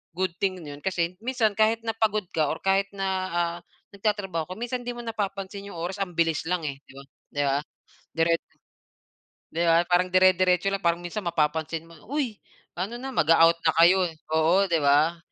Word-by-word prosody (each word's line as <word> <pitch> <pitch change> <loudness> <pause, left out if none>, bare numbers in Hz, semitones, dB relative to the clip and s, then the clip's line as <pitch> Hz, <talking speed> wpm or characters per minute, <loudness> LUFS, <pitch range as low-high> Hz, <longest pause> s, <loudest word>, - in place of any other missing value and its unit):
good 185 -1 0
thing 190 -1 0
nun 145 -1 -8
kasi 180 0 -2
minsan 230 -2 +1
kahit 225 +1 +2
na 225 - -1
pagod 215 -2 +1
ka 155 -2 +1
or 155 - -3
kahit 195 +1 +2
na, 195 0 -2 0.3
ah, 170 0 0 0.3
nagtatrabaho 195 -5 -2
ka, - - -5
minsan 245 +2 -4
'di 245 - -3
mo 240 - -7
napapansin 200 -2 -4
'yong 200 - -9
oras, 185 +4 -4
ang 180 -4 -3
bilis 165 -1 +1
lang, 180 -2 -1
eh, 140 -2 -4
di - - -15
ba, 140 - -10 0.3
di 145 - -1
ba? 140 0 +2 0.6
Dire 165 +1 +2 1.2
Di 170 +1 0
ba, 165 +1 +5
parang 180 +1 +3
dire-diretso 185 0 +4
lang, 195 - -1
parang 170 0 +2
minsan 175 +3 -5
mapapansin 160 -1 -1
mo, 165 - -15
uy, 260 -7 -2 0.4
ano 200 +7 -3
na, 265 +2 -6
mag-a-out 165 - +5
na 160 - +4
kayo, 180 +3 +5
eh, 165 - -10 0.2
oo, 160 +5 +4
di 165 -1 +2
ba? 150 +4 +3
180 Hz, 190 wpm, -26 LUFS, 165-200 Hz, 1.2 s, ba